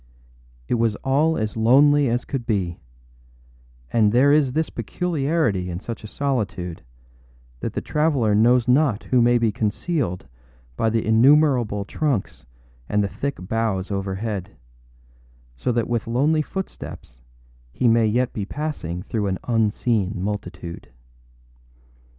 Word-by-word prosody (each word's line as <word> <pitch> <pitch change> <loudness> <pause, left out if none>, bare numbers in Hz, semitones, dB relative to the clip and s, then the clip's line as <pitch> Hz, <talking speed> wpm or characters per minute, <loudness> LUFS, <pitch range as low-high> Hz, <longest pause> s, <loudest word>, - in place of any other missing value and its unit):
It 120 - 0
was 115 -3 +1
all 150 +4 +2
as 110 0 -2
lonely 140 +5 +5
as 120 +1 -1
could 135 -4 -3
be; 95 -6 -1 1.1
and 110 -3 +4
there 130 +5 +5
is 145 -4 +3
this 160 +1 -1
peculiarity 140 - -1
in 85 0 -4
such 115 +2 -7
a - - -7
solitude, 105 -10 -3 0.8
that - - -4
the - - -2
traveller 145 -8 +1
knows 120 +3 +4
not 125 -4 +3
who 125 -2 +5
may 120 +1 +4
be 115 -2 +1
concealed 105 - -2 0.5
by 115 - +1
the 115 0 0
innumerable 120 -3 +4
trunks 130 - -2 0.4
and 105 0 +2
the - - 0
thick 140 +7 -4
boughs 110 -4 -1
overhead; 100 0 -4 1.0
so 60 - -1
that 120 -1 0
with 120 -2 -2
lonely 145 +7 +2
footsteps 150 - -7 0.5
he 125 - 0
may 115 -1 +4
yet 120 +3 0
be 105 - -3
passing 100 - -4
through 105 -1 -2
an 95 -1 -1
unseen 110 -3 0
multitude. 95 -5 -5
115 Hz, 135 wpm, -22 LUFS, 105-135 Hz, 1.1 s, lonely